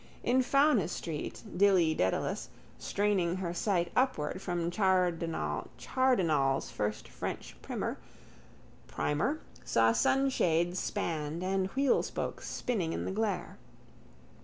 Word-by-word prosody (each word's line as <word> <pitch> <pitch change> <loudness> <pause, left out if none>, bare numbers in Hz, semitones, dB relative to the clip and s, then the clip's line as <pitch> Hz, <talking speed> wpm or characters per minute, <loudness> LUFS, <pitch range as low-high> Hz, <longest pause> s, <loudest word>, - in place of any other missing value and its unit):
In 255 +2 +3
Fownes's 265 - +3
street 155 -3 -5
Dilly 180 -4 +4
Dedalus, 95 -10 -1 0.3
straining 195 -4 +1
her 180 -2 -3
sight 175 -2 0
upward 190 - +1
from 175 -2 -1
Chardenal's 175 - +1
first 105 0 -3
French - - -6
primer, - - -3 1.6
saw 115 0 +3
sunshades 175 - +2
spanned 160 +1 -2
and 190 0 0
wheelspokes 275 -1 0
spinning 190 -10 -1
in - - -3
the - - -2
glare. 205 -2 -2
180 Hz, 95 wpm, -31 LUFS, 165-210 Hz, 1.6 s, Dilly